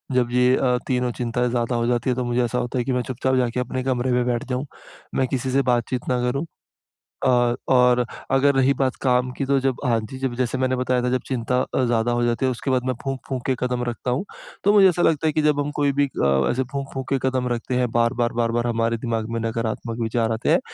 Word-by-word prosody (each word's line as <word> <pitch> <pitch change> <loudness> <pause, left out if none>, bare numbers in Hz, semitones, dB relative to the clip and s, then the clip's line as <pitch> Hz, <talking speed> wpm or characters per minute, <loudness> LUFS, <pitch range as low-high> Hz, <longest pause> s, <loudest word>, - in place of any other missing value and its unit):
जब 120 -1 +2
ये 125 +1 +4
अ, 125 -2 +2
तीनों 125 -1 0
चिंताएँ 120 +1 -1
ज़्यादा 120 0 -1
हो 115 0 0
जाती 120 +1 0
हैं। 125 - +1
तो 125 - 0
मुझे 120 0 +1
ऐसा 120 +1 -1
होता 125 +1 -2
है, 120 - +1
कि 130 - -1
मैं 125 - +1
चुप-चाप 130 +1 0
जाके 125 -1 0
अपने 125 +1 -3
कमरे 130 -1 0
में 125 0 +2
बैठ 120 -1 -1
जाऊँ, 130 +3 -2 0.5
मैं 130 - +2
किसी 130 0 -2
से 135 +2 +3
बातचीत 120 +1 -1
ना 125 - +1
करूँ। 140 +5 -2 0.8
और 120 -2 +3 0.2
और 125 -1 +5 0.3
अगर 140 +1 +4
रही 135 +1 +4
बात 130 -2 +1
काम 125 -1 +2
की 135 - -3
तो 140 0 +2
जब 130 -1 0
हाँ, 115 -2 +2
जी। 110 +4 -8
जब 130 -2 -2
जैसे 125 +1 -1
मैंने 130 0 +1
बताया 125 0 0
था 125 - +1
जब 130 0 0
चिंता 125 0 0
अ, 130 - -1
ज़्यादा 120 0 +1
हो 120 0 +1
जाती 120 +2 +1
है, 130 - +2
उसके 130 +2 -3
बाद 125 -1 +1
मैं 130 - 0
फूँक-फूँक 135 -2 -4
के 130 - +1
कदम 125 -1 -1
रखता 120 +1 -3
हूँ। 135 +11 -1 0.4
तो 205 - +4
मुझे 195 -2 +7
ऐसा 175 0 -1
लगता 160 -2 +2
है, 155 - +1
कि 155 - +1
जब 150 -1 +2
हम 145 +1 -1
कोई 145 -1 +3
भी 145 - +5
अ, 70 - +1
ऐसे 130 +2 0
फूँक-फूँक 135 -1 -5
के 135 - +2
कदम 130 -1 -1
रखते 120 +2 -3
हैं, 125 -1 +1
बार-बार, 120 +1 +1
बार-बार 120 0 0
हमारे 115 0 0
दिमाग 115 -1 -3
में 115 - -2
नकारात्मक 115 +1 -3
विचार 115 0 0
आते 110 +1 -1
हैं। - - +5
125 Hz, 250 wpm, -23 LUFS, 120-130 Hz, 0.8 s, मुझे